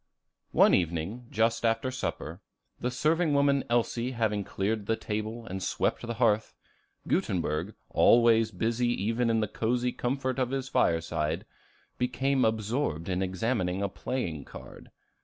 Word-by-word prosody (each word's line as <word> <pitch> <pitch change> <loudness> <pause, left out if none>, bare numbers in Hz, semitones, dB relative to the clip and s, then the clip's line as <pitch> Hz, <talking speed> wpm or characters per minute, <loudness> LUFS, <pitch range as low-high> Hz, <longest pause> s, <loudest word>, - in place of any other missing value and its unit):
One - - +5
evening, 90 +7 -1
just 115 +2 +1
after 115 +3 +1
supper, 90 -8 -4 0.4
the 125 - -1
serving 155 +4 +1
woman 140 -1 +3
Elsie 120 +1 0
having 110 -3 0
cleared 105 +2 -2
the 115 - +2
table 110 +2 -4
and 95 -2 -5
swept - - 0
the 120 -1 -4
hearth, 110 -2 +1 0.5
Gutenberg, 85 +3 -1 0.2
always 115 -1 +5
busy 115 +5 0
even 115 +2 0
in 115 -1 +2
the 110 - 0
cozy 120 +4 0
comfort 130 +1 -2
of 130 -2 +1
his 135 0 -3
fireside, 80 -3 0 0.5
became 130 +2 +1
absorbed 110 - -1
in 90 0 0
examining 95 0 -1
a 100 - 0
playing 95 - -3
card. - - -12
115 Hz, 140 wpm, -29 LUFS, 95-125 Hz, 0.5 s, One